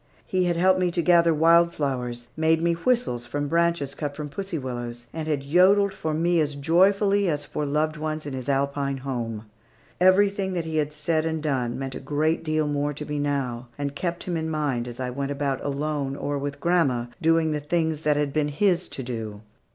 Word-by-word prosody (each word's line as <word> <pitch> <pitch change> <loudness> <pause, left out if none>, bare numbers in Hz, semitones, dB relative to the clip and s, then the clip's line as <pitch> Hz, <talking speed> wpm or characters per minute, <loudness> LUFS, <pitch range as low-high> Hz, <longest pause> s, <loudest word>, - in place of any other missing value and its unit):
He 185 -1 +1
had 175 -1 +1
helped 185 +2 +4
me 180 -1 +2
to 170 - +1
gather 170 -1 +5
wild 170 +2 +4
flowers, 125 -4 -3
made 160 0 +3
me 170 +1 +2
whistles 170 - 0
from 145 +3 -2
branches 170 -3 +1
cut 145 -2 -4
from 150 0 -5
the - - -19
pussy 195 -4 -3
willows, 120 -3 -5
and 160 -1 -4
had 145 -3 -1
yodeled 190 +6 +4
for 155 -4 -3
me 170 +2 +2
as 150 -2 0
joyfully 195 +6 +3
as 145 -2 -1
for 150 -1 -3
loved 150 +2 0
ones 155 0 -3
in 145 - -5
his 130 0 -5
Alpine 140 0 0
home. 115 -5 -3 0.5
Everything 190 +1 +3
that 170 -2 -2
he 160 -1 -2
had 150 -1 0
said 155 +1 0
and 160 -1 -2
done 125 -5 -1
meant 135 0 -4
a - - -6
great 155 +2 0
deal 155 -1 0
more 145 0 -1
to 150 - -5
me 150 -1 -3
now, 130 -4 -2
and 140 -1 -3
kept 175 +2 -3
him 180 - -3
in 160 0 -2
mind, 145 -6 -1
as 120 0 -8
I 125 -1 -2
went 140 +2 -3
about 140 -2 -2
alone, 145 -1 -2
or 145 0 -2
with 140 0 -4
grandma, 140 -8 +2 0.2
doing 165 0 +3
the 150 - -1
things 160 0 -1
that 150 -2 +2
had 145 -2 0
been 150 -1 +1
his 180 +4 +1
to 135 - -5
do. 110 -4 -5
150 Hz, 215 wpm, -25 LUFS, 140-170 Hz, 0.5 s, gather